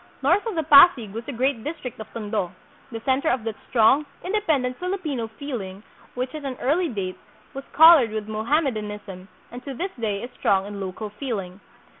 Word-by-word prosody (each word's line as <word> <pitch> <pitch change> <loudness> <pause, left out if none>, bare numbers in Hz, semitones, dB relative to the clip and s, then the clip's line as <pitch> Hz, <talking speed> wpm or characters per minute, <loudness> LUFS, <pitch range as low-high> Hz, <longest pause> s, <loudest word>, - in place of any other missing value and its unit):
North 345 +9 +3
of 440 - -3
the 320 - 0
Pasig 280 - +6
was 230 +2 -5
the - - -5
great 255 -1 -1
district 290 -7 -6
of 220 0 -9
Tondo, 210 -5 -3 0.4
the 225 -1 -6
center 270 +5 +1
of 245 -3 0
that 225 -1 -3 0.2
strong, 255 +5 +4 0.2
independent 310 -11 0
Filipino 350 - -3
feeling 220 -6 -7 0.3
which 255 +1 -3
at 305 -1 -7
an 265 -2 -4
early 330 +7 +1
date 195 -6 -4 0.3
was 275 0 -7
colored 320 -6 +8
with 215 -1 -5
Moham 225 +9 0
medanism 210 -5 -6 0.2
and 245 +1 -9
to 275 -2 -6
this 375 +9 -3
day 210 -2 -2
is 245 - -7
strong 195 -1 +1
in 200 0 -7
local 195 +3 -5
feeling. 205 -6 -5
245 Hz, 185 wpm, -24 LUFS, 210-285 Hz, 0.4 s, colored